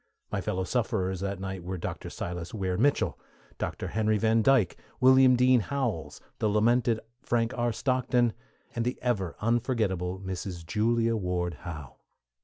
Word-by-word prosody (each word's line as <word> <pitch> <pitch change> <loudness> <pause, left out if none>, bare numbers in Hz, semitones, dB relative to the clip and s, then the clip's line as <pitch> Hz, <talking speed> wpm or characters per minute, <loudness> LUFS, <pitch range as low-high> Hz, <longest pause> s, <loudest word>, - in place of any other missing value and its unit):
My - - -1
fellow 95 0 -1
sufferers 95 -4 -1
that 100 0 -3
night 95 -2 -5
were 95 +1 -4
Dr. - - -5
Silas 90 +2 -5
Weir 95 -3 -1
Mitchell, 140 +9 +1 0.4
Dr. - - -3
Henry 110 0 +1
Van 110 +1 +3
Dyke, 125 -6 +3 0.2
William 130 0 +7
Dean 125 0 +5
Howells, 120 - -2 0.2
the 110 - +2
lamented 115 +2 +3 0.2
Frank 115 -1 0
R. 120 -1 +1
Stockton, 125 -1 +1 0.4
and 115 - -1
the 125 +2 -2
ever 100 -9 0
unforgettable 110 -6 0
Mrs. 95 -2 -5
Julia 115 +4 +1
Ward 90 -3 -1
Howe. 75 -3 -8
110 Hz, 145 wpm, -28 LUFS, 95-120 Hz, 0.4 s, William